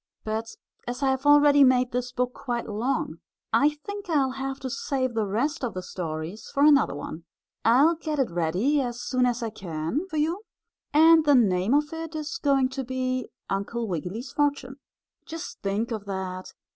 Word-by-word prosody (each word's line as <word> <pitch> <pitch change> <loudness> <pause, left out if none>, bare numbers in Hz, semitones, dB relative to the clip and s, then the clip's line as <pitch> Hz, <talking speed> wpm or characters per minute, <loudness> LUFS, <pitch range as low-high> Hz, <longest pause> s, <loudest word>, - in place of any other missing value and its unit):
But 220 +1 -4 0.3
as 245 +3 -4
I 270 - +3
have 265 +2 -2
already 290 -1 +7
made 255 -1 +4
this 245 0 -2
book 250 0 -1
quite 240 -3 -4
long, 230 +6 -2 0.3
I 295 +1 +3
think 405 -2 -6
I 290 -5 +3
will 260 - -2
have 270 +1 -4
to 260 - -4
save 255 -2 -1
the 220 -2 0
rest 250 +9 -1
of 240 - -2
the 185 - -4
stories 165 +3 -5
for 280 - +3
another 290 - +5
one. 155 +3 -7 0.4
I'll 265 +9 +5
get 315 -2 -4
it 265 -9 0
ready 180 - +1
as 240 -2 -4
soon 250 0 +1
as 240 0 -1
I 225 - -3
can 180 - -3
for 320 -5 -5
you, 325 +6 0 0.5
and 320 +1 +6
the 290 -2 +5
name 200 0 +3
of 295 +1 +1
it 325 0 -6
is 310 +8 -4
going 270 -3 +2
to 265 0 -4
be 255 -1 -2 0.2
"Uncle 220 +4 -2
Wiggily's 185 - -4
Fortune." 285 -2 -1 0.5
Just 330 +1 -7
think 205 +4 -1
of 215 -3 -4
that! 190 -2 -5
255 Hz, 185 wpm, -26 LUFS, 215-290 Hz, 0.5 s, already